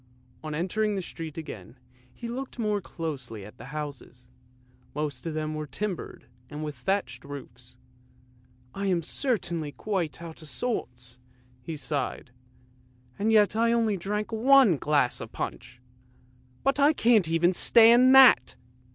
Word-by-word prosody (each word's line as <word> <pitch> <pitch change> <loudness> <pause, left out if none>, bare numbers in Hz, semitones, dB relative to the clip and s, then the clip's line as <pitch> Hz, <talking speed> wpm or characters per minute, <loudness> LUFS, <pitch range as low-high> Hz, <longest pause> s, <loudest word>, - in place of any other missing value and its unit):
On 155 -1 -4
entering 205 +6 -1
the 195 - -2
street 165 -3 -8
again, 135 - -9 0.3
he 235 - -8
looked 255 +3 -6
more 210 -3 -1
closely 130 - -6
at 105 - -14
the - - -10
houses, 140 -3 -8 0.7
most 150 -1 -4
of 160 - -4
them 155 0 -3
were 155 0 -5
timbered, 200 +4 -5 0.2
and 150 +1 -6
with 150 -1 -4
thatched 125 -2 -2
roofs. 125 -3 -10 0.5
" 125 0 -32
I 200 - -1
am 175 -3 +1
certainly 170 - -2
quite 175 -7 -3
out 165 -1 -9
of 155 - -9
sorts," 125 - -4 0.4
he 160 +5 -6
sighed, 140 -3 -4 0.4
" 125 0 -33
and 215 +2 +1
yet 210 -1 +4
I 230 +1 +2
only 225 -3 +1
drank 210 +4 -3
one 240 - +5
glass 145 -3 +1
of - - -8
punch. 125 0 -6 0.8
But 275 +1 +1
I 290 +2 +5
can't 230 -7 +4 0.3
stand - - +1
even 235 +3 +8
that! 260 - +7
160 Hz, 150 wpm, -27 LUFS, 125-215 Hz, 0.8 s, even